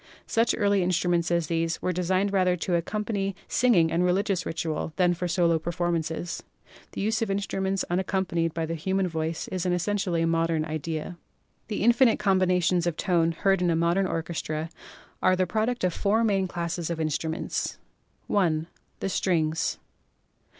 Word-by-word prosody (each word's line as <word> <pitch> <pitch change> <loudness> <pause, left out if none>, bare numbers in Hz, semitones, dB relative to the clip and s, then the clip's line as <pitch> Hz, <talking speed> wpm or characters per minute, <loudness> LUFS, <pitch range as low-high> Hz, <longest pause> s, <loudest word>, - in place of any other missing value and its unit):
Such 230 +1 +2
early 205 -2 +3
instruments 175 -1 +1
as 170 -1 +1
these 165 +1 -1
were 185 - -1
designed 185 +3 0
rather 185 -2 +3
to 180 +1 -2
accompany 195 +2 -1
singing 190 -10 +3
and 170 +2 +2
religious 185 0 +1
ritual 160 -1 -3
than 180 -2 +3
for 180 +1 -3
solo 170 -1 +2
performances. 170 0 -2 0.5
The - - -4
use 220 +2 0
of 225 - 0
instruments 195 -1 -1
unaccom 190 +2 0
panied 165 -1 0
by 165 -1 -1
the 165 - -3
human 190 +4 0
voice 160 -1 -3
is 185 -2 -2
an 180 - +1
essentially 180 -2 0
modern 165 -1 +1
idea. 160 +2 -4 0.5
The 210 - -2
infinite 240 0 +5
combinations 185 -3 +2
of 170 -2 -1
tone 170 -3 +2
heard 195 +2 +2
in 175 - +2
a 165 - +2
modern 170 +4 +2
orchestra 160 -1 -3 0.5
are 185 - +4
the 185 0 +1
product 220 +5 -1
of 180 -2 +2
four 215 +5 +1
main 195 -4 +2
classes 170 -1 -3
of 170 -1 -3
in 155 -1 0
struments: 160 +2 -2 0.5
(i) 165 -6 +1 0.4
The - - -1
Strings. 165 -4 0
175 Hz, 165 wpm, -26 LUFS, 165-195 Hz, 0.5 s, infinite